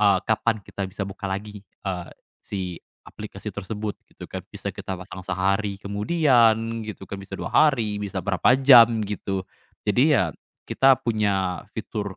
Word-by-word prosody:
eee, 100 Hz, -2 st, +5 dB
kapan 110 Hz, 0 st, +1 dB
kita 100 Hz, -2 st, -5 dB
bisa 100 Hz, +1 st, -4 dB
buka 95 Hz, 0 st, -6 dB
lagi, 105 Hz, +1 st, -5 dB
eee, 95 Hz, -2 st, -6 dB, 0.3 s
si 100 Hz, -, -5 dB, 0.4 s
aplikasi -, -, -8 dB
tersebut, 105 Hz, 0 st, -5 dB
gitu -, -, -11 dB
kan. -, -, -6 dB
Bisa -, -, -6 dB
kita 95 Hz, -, -5 dB
pasang 95 Hz, +1 st, -9 dB
sehari 100 Hz, +2 st, 0 dB
kemudian, 115 Hz, 0 st, +2 dB
gitu 105 Hz, -2 st, -7 dB
kan, 100 Hz, -, -6 dB
bisa 100 Hz, -, -8 dB
2 -, -, -5 dB
hari, 115 Hz, -9 st, +3 dB
bisa 100 Hz, -2 st, -3 dB
berapa 100 Hz, +6 st, +3 dB
jam, 120 Hz, -4 st, +7 dB
gitu. 95 Hz, -2 st, -3 dB, 0.4 s
Jadi 130 Hz, +8 st, +4 dB
ya 85 Hz, -4 st, +1 dB, 0.4 s
kita 135 Hz, -1 st, +5 dB
punya 100 Hz, -6 st, 0 dB
fitur, 100 Hz, -3 st, -5 dB
105 Hz, 155 wpm, -24 LUFS, 95-115 Hz, 0.4 s, jam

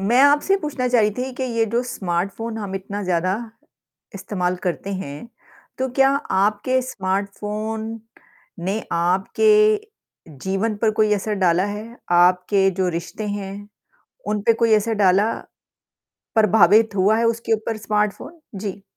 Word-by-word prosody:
मैं 230 Hz, +6 st, +3 dB
आपसे 290 Hz, +7 st, +4 dB
पूछना 280 Hz, -4 st, -2 dB
चाह 245 Hz, -1 st, +3 dB
रही 210 Hz, 0 st, +3 dB
थी 260 Hz, +1 st, -3 dB
कि 260 Hz, -, -5 dB
ये 230 Hz, -3 st, 0 dB
जो 240 Hz, -, +2 dB
स्मार्टफ़ोन 200 Hz, +1 st, -3 dB
हम 200 Hz, -3 st, -5 dB
इतना 200 Hz, +2 st, -5 dB
ज़्यादा 185 Hz, 0 st, 0 dB, 0.8 s
इस्तेमाल 185 Hz, -2 st, -2 dB
करते 185 Hz, +2 st, -2 dB
हैं, 165 Hz, +2 st, -7 dB, 0.5 s
तो 260 Hz, 0 st, -1 dB
क्या 270 Hz, 0 st, +5 dB, 0.2 s
आपके 210 Hz, +6 st, +1 dB
स्मार्टफ़ोन 210 Hz, +1 st, -3 dB, 0.8 s
ने 200 Hz, +3 st, -1 dB
आपके 185 Hz, -, +2 dB, 0.9 s
जीवन 195 Hz, +3 st, -1 dB
पर 220 Hz, -, +4 dB
कोई 215 Hz, 0 st, +2 dB
असर 210 Hz, +1 st, -2 dB
डाला 180 Hz, -1 st, +3 dB
है? 215 Hz, +3 st, -7 dB
आपके 180 Hz, +2 st, +4 dB
जो 185 Hz, -, +2 dB
रिश्ते 175 Hz, +5 st, -5 dB
हैं, 205 Hz, 0 st, -6 dB, 0.6 s
उन 210 Hz, -1 st, -1 dB
पे 230 Hz, +3 st, +4 dB
कोई 230 Hz, 0 st, +1 dB
ऐसे 220 Hz, +1 st, +2 dB
डाला? 200 Hz, +2 st, +3 dB, 1.0 s
प्रभावित 215 Hz, 0 st, +5 dB
हुआ 200 Hz, +3 st, +3 dB
है 230 Hz, -, +1 dB
उसके 230 Hz, 0 st, -1 dB
ऊपर 220 Hz, +1 st, -3 dB
स्मार्टफ़ोन? 210 Hz, +9 st, -2 dB, 0.2 s
जी। 200 Hz, 0 st, -5 dB
210 Hz, 140 wpm, -21 LUFS, 190-225 Hz, 1.0 s, क्या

